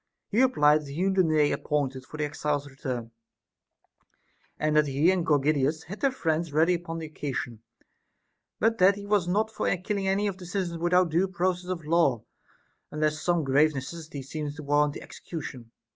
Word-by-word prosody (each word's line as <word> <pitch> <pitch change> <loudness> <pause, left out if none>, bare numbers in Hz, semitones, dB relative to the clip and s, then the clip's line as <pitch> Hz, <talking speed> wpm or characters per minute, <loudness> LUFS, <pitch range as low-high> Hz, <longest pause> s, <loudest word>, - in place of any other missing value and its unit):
He 220 +4 +2
replied 150 - +4
that 145 - -11
he 145 +6 -3
knew 195 0 +2
the 190 - +4
day 155 -3 +3
appointed 135 -3 -2
for 155 - -9
the 150 - 0
exiles' 145 -1 -2
return, 130 -4 -5 1.5
and 155 0 0
that 150 -1 +4
he 145 +6 +3
and 185 -2 0
Gorgidas 150 0 +1
had 200 +5 -8
their 275 - +3
friends 165 - -1
ready 160 +4 +3
upon 165 -1 -4
occasion; 140 -7 -5 1.0
but 225 0 +2
that 190 +2 +6
he 200 0 -8
was 205 -4 +1
not 215 +4 +1
for - - -1
killing 195 +2 -2
any 195 +2 +1
of 195 -2 -2
the 180 - -9
citizens 180 -2 -3
without 180 0 +3
due 175 +4 +2
process 180 -1 -1
of 170 -4 -4
law, 150 -8 +2 0.7
unless 155 0 -1
some 175 -2 +1
grave 145 +3 +3
necessity 145 +1 -6
seemed 145 +1 -5
to 155 - -8
warrant 145 0 +2
the - - -8
execution. 130 -8 -8
155 Hz, 180 wpm, -27 LUFS, 145-180 Hz, 1.5 s, that